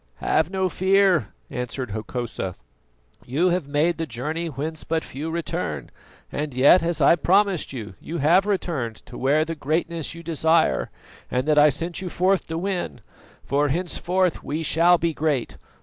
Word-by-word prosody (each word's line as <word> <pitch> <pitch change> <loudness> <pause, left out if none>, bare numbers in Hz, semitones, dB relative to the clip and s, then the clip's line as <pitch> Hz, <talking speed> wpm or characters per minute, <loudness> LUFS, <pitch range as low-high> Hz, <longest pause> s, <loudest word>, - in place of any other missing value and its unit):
"Have 160 +1 +1
no 190 0 0
fear," 190 -2 +3 0.2
answered 125 -1 -4
Hokosa; 110 -3 -4 0.7
"you 155 +9 +1
have 175 -4 -1
made 155 +4 +1
the 165 - -2
journey 150 +8 -3
whence 155 +2 -4
but 160 0 -1
few 150 +4 -6
return; 170 0 -3 0.4
and 145 -3 -4
yet, 140 +8 +6
as 165 -2 -1
I 140 - +6
promised 190 +1 +2
you, 110 -6 -7
you 170 - -5
have 175 +7 +4
returned 155 - -1
to - - -12
wear 145 +4 +2
the 165 - -3
greatness 165 +2 -2
you 170 - -10
desire 160 0 +2 0.4
and 125 +3 -1
that 150 -1 +4
I 150 +1 +7
sent 170 +6 -3
you 185 - -4
forth 185 +1 +1
to 160 - -3
win; 185 +1 -3 0.4
for 145 +2 +1
henceforth 180 +2 0
we 155 +3 -3
shall 170 +3 +4
be 165 -1 0
great. 150 -5 -1
160 Hz, 165 wpm, -24 LUFS, 145-175 Hz, 0.7 s, I